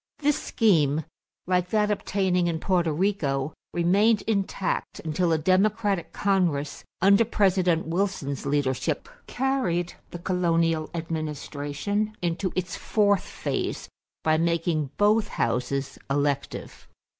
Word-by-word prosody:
This 295 -1 +1
scheme, 160 - +2 0.4
like 180 0 +1
that 210 0 +2
obtaining 190 -3 +1
in 165 -2 -1
Porto 175 -3 +1
Rico, 150 -5 0 0.2
remained 200 +6 +3
intact 195 -3 -1
until 165 +2 0
a 160 - +3
Democratic 195 +3 +1
Congress 175 -8 0 0.2
under 200 +3 +6
President 185 -6 +2
Wilson's 165 -6 -2
leadership 140 -2 0 0.2
carried 245 -10 0 0.2
the - - -7
colonial 165 -3 +1
administration 160 +5 -3
into 180 +2 -1
its 185 0 -2
fourth 205 -3 +2
phase - - -3 0.3
by 155 0 +3
making 165 -3 0
both 210 +1 +3
houses 130 - -2
elective. 140 0 -2
175 Hz, 110 wpm, -26 LUFS, 155-200 Hz, 0.4 s, under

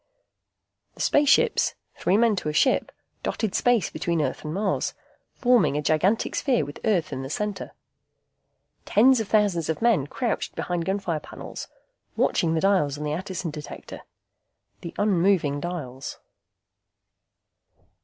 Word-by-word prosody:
The - - -8
spaceships, 295 - +3 0.2
three 190 - +2
men 230 -1 +4
to 155 - -2
a - - -3
ship, 260 - +2 0.3
dotted 220 -4 -2
space 240 -7 +2
between 170 -1 -1
Earth 150 - -2
and 155 - -4
Mars, 195 +3 -1 0.4
forming 225 - +3
a - - 0
gigantic 175 +9 +1
sphere 250 - +1
with 145 - -9
Earth 185 -9 +1
in 130 - -4
the 135 - -6
center. 210 +6 -3 1.1
Tens 255 +4 +5
of 220 - -2
thousands 200 -7 +2
of 160 - -1
men 225 - +2
crouched 240 - -2
behind 175 -2 -2
gunfire 190 -5 -1
panels, - - -8 0.5
watching 165 -1 +1
the 160 - 0
dials 185 -8 +2
on 150 - -5
the 150 0 -2
Attison 185 0 -4
Detector. 150 -1 -9 0.8
The 170 - -8
unmoving 180 -7 +2
dials. 145 -6 -5
180 Hz, 135 wpm, -25 LUFS, 155-215 Hz, 1.1 s, Tens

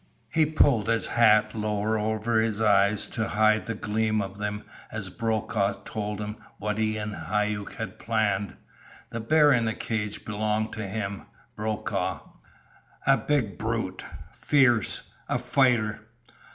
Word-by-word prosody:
He 160 -1 +4
pulled 140 -8 +3
his 115 0 +2
hat 110 -2 +4
lower 105 0 -1
over 110 +1 0
his 110 -1 0
eyes 105 -1 +3
to 110 -2 -2
hide 110 0 +2
the 115 - -2
gleam 110 +1 0
of 100 0 -5
them 105 0 -3 0.3
as 100 -4 -4
Brokaw 110 -2 0
told 105 -1 -4
him 105 0 -5 0.2
what 105 +1 -2
he 110 0 +1
and 105 0 -4
Hauck 105 -1 -2
had - - -6
planned. 105 -3 0 0.6
The 115 - -3
bear 150 +6 +4
in 120 -2 +2
the 110 - -1
cage 105 -2 -3
belonged 110 +1 -1
to 105 -3 -4
him 100 0 -4 0.3
Brokaw. 110 0 -2 0.8
A - - +6
big 125 -10 -1
brute. 110 -4 -2 0.3
Fierce. 120 -7 +3 0.3
A - - +1
fighter. 115 -6 +2
110 Hz, 140 wpm, -27 LUFS, 105-115 Hz, 0.8 s, A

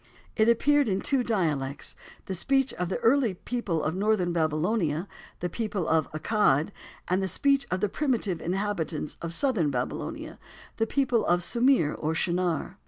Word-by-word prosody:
It 220 0 +4
appeared 285 +2 +3
in 190 -1 +1
two 270 +3 +1
dialects, 150 - -1 0.3
the 190 - -4
speech 270 +8 +1
of 180 -1 -3
the - - -1
early 235 -4 +3
people 185 -7 -2
of 155 - 0
northern 190 -2 +1
Babylonia—the 165 +2 -1
people 210 -6 -2
of 160 -1 +1
Accad—and 180 +1 0
the 190 - 0
speech 275 +9 +1
of 185 0 -1
the 210 - +2
primitive 225 - -1
inhabitants 175 -5 -2
of 170 - -4
southern 205 - +2
Babylonia—the 135 - -5
people 250 -3 +1
of 175 0 +2
Sumir 235 - +3
or 155 +1 -2
Shinar. 180 +2 -1
190 Hz, 145 wpm, -27 LUFS, 165-230 Hz, 0.3 s, It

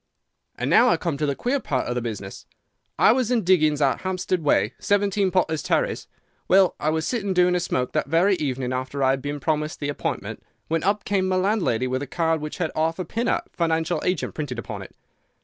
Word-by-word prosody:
"And - - -3
now 245 +2 +5
I 170 - +3
come 165 -2 -2
to 150 +1 -1
the 140 - 0
queer 260 - 0
part 130 - -2
of 120 - -2
the 125 - -2
business. 105 -4 -6 0.5
I - - +6
was 250 -1 +1
in 240 -4 +1
diggings 155 -5 +3
out 135 -3 +1
Hampstead 185 -1 -1
way—17, 200 - +1
Potter's 160 -4 +1
Terrace. - - -1 0.4
Well, 190 -1 +5
I 155 - 0
was 160 0 -1
sitting 200 -6 -1
doing 180 0 +4
a 180 - +2
smoke 130 -7 -1
that - - -1
very 170 +7 +3
evening 130 -4 -2
after 130 +2 -3
I 130 - +4
had 135 0 -1
been 145 +1 -4
promised 150 +1 -1
the 145 - -2
appointment, 145 - -4 0.3
when 165 0 0
up 200 +2 0
came 195 -2 +1
my 185 - +1
landlady 185 - +1
with 130 +1 -2
a 145 - -4
card 165 +1 0
which 150 0 -5
had 165 -3 -1
'Arthur 165 +3 0
Pinner, 230 +7 -1
Financial 165 -1 0
Agent,' 180 -3 -1
printed 145 -6 -4
upon 115 - -6
it. - - -12
165 Hz, 210 wpm, -24 LUFS, 140-185 Hz, 0.5 s, I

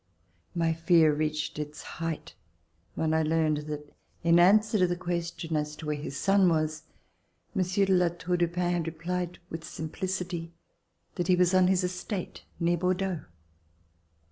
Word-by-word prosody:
My 165 -1 +2
fear 165 -1 +4
reached 150 0 -2
its 150 0 -6
height 165 - -5 0.6
when 160 0 0
I 160 - +3
learned 155 -1 +2
that 150 -1 -6 0.3
in 170 0 +5
answer 210 +4 +5
to 180 - +4
the 175 - -1
question 170 -2 -3
as 150 0 -1
to 155 - -9
where 150 0 -1
his 145 -1 -5
son 195 0 +4
was. 155 -1 0 0.7
Monsieur 185 +2 +2
de 190 - +2
La 180 -1 +4
Tour 175 +1 -2
du 175 0 +2
Pin 175 +1 -1
had 170 -2 -1
replied 175 +2 -3
with 165 0 -5
simplicity 175 +1 -4 0.6
that 175 - -1
he 185 - +5
was 180 0 +3
on 185 -1 +5
his 185 0 +2
estate, 180 +1 -4 0.2
near 170 0 +2
Bordeaux. 185 0 0
170 Hz, 160 wpm, -28 LUFS, 160-180 Hz, 0.7 s, in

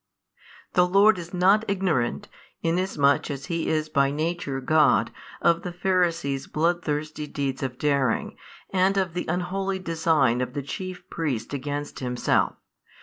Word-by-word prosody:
The 180 0 +4
Lord 195 +1 +5
is 170 0 -8
not 195 +4 +4
ignorant, 185 -11 0 0.4
inasmuch 165 -5 +2
as 140 -2 -5
He 170 -2 -2
is 155 -1 0
by 140 -3 +2
Nature 155 -2 -2
God, 150 0 +3 0.3
of 170 0 +4
the 180 - -5
Pharisees' 170 -7 0
bloodthirsty 155 -2 -1
deeds 140 -2 -3
of 130 -2 -3
daring, 140 -5 0 0.4
and 190 +1 +2
of 185 -3 0
the 180 - -3
unholy 190 +3 -1
design 160 -8 +1
of 125 0 -3
the 145 -1 -3
chief 185 +6 -6
priests 145 -7 -3
against 145 +1 -4
Himself. 125 -2 0
160 Hz, 140 wpm, -25 LUFS, 140-180 Hz, 0.4 s, Lord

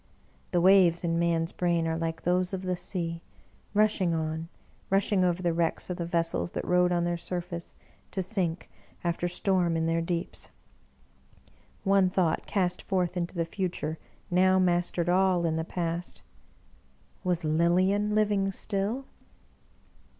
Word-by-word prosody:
The 175 - +1
waves 180 -2 +5
in 165 -1 0
man's 165 -1 +1
brain 170 -2 0
are 160 - 0
like 165 0 -3
those 180 +1 +1
of 190 0 -3
the 185 -1 -1
sea, 170 -2 -3 0.5
rushing 205 -5 +3
on, 160 +1 -3 0.4
rushing 195 0 +2
over 180 0 +1
the 170 -1 +2
wrecks 170 +2 -1
of 180 - -3
the 170 - -3
vessels 170 0 -1
that - - -3
rode 180 0 +3
on 175 -1 +1
their 175 0 0
surface, 175 0 -5 0.3
to 190 - -2
sink, 180 -3 -2 0.4
after 175 0 0
storm, 175 -2 +1
in 160 - 0
their 165 0 +1
deeps. 170 0 -4 1.3
One 195 -1 +4
thought 180 -3 0
cast 180 -3 0
forth 180 -2 -1
into 175 +1 -3
the 165 -1 0
future 165 -3 -3 0.3
now 185 +1 +4
mastered 175 -1 +1
all 180 -1 +3
in 160 -1 +1
the 160 - -1
past: 170 0 -3 0.5
" 65 0 -34
Was 180 -2 0
Lilian 185 +6 +2
living 205 -2 +2
still 210 +7 -2
175 Hz, 150 wpm, -28 LUFS, 165-185 Hz, 1.3 s, waves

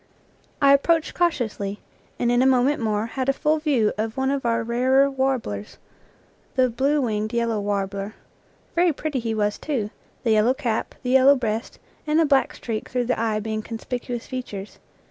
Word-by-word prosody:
I 275 0 +7
approached 320 +3 +2
cautiously, 220 - -1 0.4
and 240 0 +1
in 245 0 +3
a 260 - +4
moment 265 +2 +3
more 215 -1 0
had 260 +3 -2
a - - +4
full 305 +3 +1
view 270 -9 +2
of 220 +3 -2
one 265 0 +1
of 275 -3 -1
our 230 0 +1
rarer 260 +4 +3
warblers, 260 - -2 0.8
the 255 -2 +3
blue 275 +6 +1
winged 215 -4 -1
yellow 235 -2 0
warbler. 200 0 -2 0.6
Very 345 -1 +3
pretty 295 -1 -3
he 225 -1 -2
was, 210 -1 0
too, 235 -9 -2 0.3
the 230 - +2
yellow 220 +4 +4
cap, 240 -6 -2
the 250 - -1
yellow 265 +2 +7
breast, 225 -3 -3 0.3
and 305 +1 +3
the 325 - +5
black 275 -2 +2
streak 220 -3 -5
through 250 -1 -1
the 250 - 0
eye 220 -2 0
being 215 0 -3
conspicuous 240 +2 -5
features. 215 -6 -7
245 Hz, 175 wpm, -23 LUFS, 220-270 Hz, 0.8 s, I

